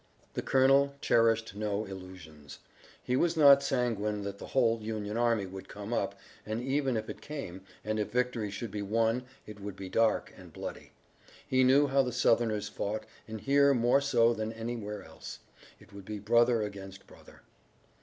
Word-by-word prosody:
The - - -2
colonel 135 +1 +3
cherished 115 -4 +2
no 105 0 -2
illusions. 90 -7 -11 0.5
He 125 - 0
was 170 +4 +1
not 140 -2 +8
sanguine 110 -6 -1
that 100 0 -6
the - - -8
whole 115 -4 +2
Union 105 -1 -4
army 115 -3 +1
would 95 0 -9
come 105 +3 -6
up, - - -1 0.3
and 110 +1 -3
even 135 -1 0
if 110 - -4
it - - -8
came, 135 -12 -7 0.2
and 110 0 -1
if 105 - -1
victory 125 -3 0
should 100 +2 -6
be 105 - -4
won 115 +4 0 0.2
it 105 -1 -10
would 100 -1 -6
be 95 -1 -8
dark 115 +3 +1
and - - -14
bloody. - - -8 0.5
He 130 0 +3
knew 135 +3 +5
how 135 0 +3
the 125 -2 -2
Southerners 115 -3 +2
fought, 110 +2 -4 0.2
and 110 -1 -7
here 140 0 +4
more 120 +3 +3
so 120 -4 +3
than 110 0 -3
anywhere 110 -3 -5
else, 80 0 -10 0.4
it - - -19
would 100 -1 -10
be 105 +1 -5
brother 115 +2 +3
against 95 -2 -8
brother. - - -17
115 Hz, 175 wpm, -30 LUFS, 105-125 Hz, 0.5 s, not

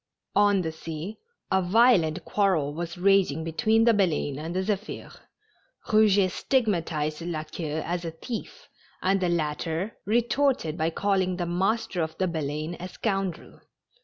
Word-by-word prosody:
On 205 -2 +4
the 160 - -2
sea 160 +5 -7 0.3
a 190 - +3
violent 185 -5 +3
quarrel 180 -9 +1
was 170 +2 -5
raging 185 -5 +3
between 220 +8 +2
the 235 0 +5
Baleine 160 -8 0
and 165 +3 -5
the 190 - +1
Zephir, 210 +1 -3 0.8
Eouget 205 -3 +4
stigmatized 170 - 0
La 165 -2 -3
Queue 155 0 -4
as 175 +1 -2
a 165 - -3
thief, 215 +8 -7 0.4
and 195 +1 +2
the 180 - +1
latter 165 +4 -2
retorted 235 - +1
by 160 -1 0
calling 190 +1 0
the 175 - -1
master 190 +2 0
of 160 0 -3
the 185 - +1
Baleine 155 0 -3
a 180 - -5
scoundrel. 195 -3 -3
180 Hz, 145 wpm, -26 LUFS, 160-205 Hz, 0.8 s, the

